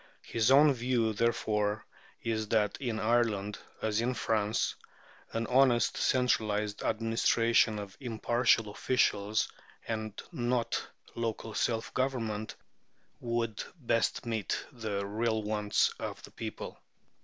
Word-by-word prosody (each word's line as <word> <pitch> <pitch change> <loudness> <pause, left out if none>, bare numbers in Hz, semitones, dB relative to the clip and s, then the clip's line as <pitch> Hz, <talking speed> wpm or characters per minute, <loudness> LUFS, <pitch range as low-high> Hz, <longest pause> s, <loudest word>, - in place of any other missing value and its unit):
His 115 0 +1
own 145 +2 +7
view, 120 -3 +1
therefore, 105 -2 0 0.4
is 110 -1 -1
"that 105 -2 +2
in 120 -4 -2
Ireland, 110 -3 +1 0.2
as 110 0 +1
in 125 +2 0
France, 110 -1 0 0.6
an 115 0 -1
honest, 125 -1 +4
centralized 105 -5 +1
administration 115 0 +2
of 100 -2 -7
impartial 120 -3 +2
officials, 105 -2 +1 0.4
and 110 -2 -3
not 120 -1 -1 0.3
local 115 -1 -3
self 115 +1 -1
government, 115 -5 -1 0.6
would 115 -2 -2
best 115 -8 0
meet 110 -3 -2
the 105 -4 -3
real 110 +2 0
wants 105 0 +2
of - - -5
the - - -11
people." - - -6
115 Hz, 110 wpm, -31 LUFS, 105-120 Hz, 0.6 s, own